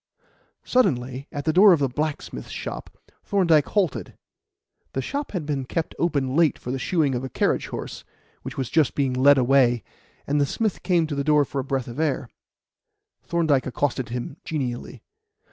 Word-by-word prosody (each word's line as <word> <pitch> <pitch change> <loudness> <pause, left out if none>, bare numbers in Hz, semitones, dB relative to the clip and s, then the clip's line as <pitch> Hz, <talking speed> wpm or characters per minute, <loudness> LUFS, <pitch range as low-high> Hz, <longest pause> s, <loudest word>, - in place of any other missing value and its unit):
Suddenly, 135 - 0
at 145 -3 -5
the 155 - +2
door 195 +2 +8
of 160 - +1
a - - +3
blacksmith's 150 +4 -4
shop, - - -7 0.3
Thorndyke 170 -7 +3
halted. 190 -8 -1 0.8
The 135 - -1
shop 285 - -4
had 175 -6 -3
been 145 -3 -2
kept 160 +5 -3
open 140 -6 0
late 165 -3 +3
for 125 - -6
the 135 - -2
shoeing 155 -2 +1
of 125 +1 -2
a 130 - -4
carriage - - 0
horse, - - -6 0.4
which - - -8
was 130 -3 -3
just 150 -10 +2
being 135 -3 +1
led 140 +2 +5
away, 125 -3 +3 0.4
and 145 +1 +1
the 140 - +2
smith 215 +3 0
had - - -19
come 175 -3 +3
to 155 - -4
the 140 0 -1
door 150 0 +4
for 135 - -4
a - - -1
breath 135 -2 -2
of 120 +4 -7
air. 140 -6 -1 0.9
Thorndyke 160 -6 +1
accosted 130 -1 -1
him 125 +4 -5
genially. 130 -6 -4
145 Hz, 180 wpm, -24 LUFS, 130-160 Hz, 0.9 s, door